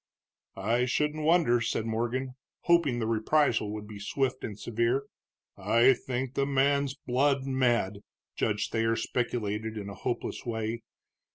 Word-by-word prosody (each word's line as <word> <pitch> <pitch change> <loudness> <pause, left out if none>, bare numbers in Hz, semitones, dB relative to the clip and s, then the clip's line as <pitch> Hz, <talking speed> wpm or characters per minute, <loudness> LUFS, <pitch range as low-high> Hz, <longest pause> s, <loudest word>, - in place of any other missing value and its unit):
"I 115 +6 +1
shouldn't 150 +4 0
wonder," 155 -8 +4
said 115 -1 -1
Morgan, 120 +3 -2 0.3
hoping 170 -8 +3
the 115 - -1
reprisal 115 0 +2
would 105 0 -6
be 105 -1 -9
swift 130 +5 -1
and 105 -2 -6
severe. 120 +4 0 0.5
"I 120 +3 +4
think 130 +1 -4
the 135 0 0
man's 140 0 +2
blood 135 +1 +1
mad," 120 -7 +1 0.4
Judge 105 -2 0
Thayer 115 0 +1
speculated, 110 -2 -2
in 100 -1 -5
a - - -7
hopeless 120 - -4
way. 115 0 -3
120 Hz, 140 wpm, -29 LUFS, 110-135 Hz, 0.5 s, wonder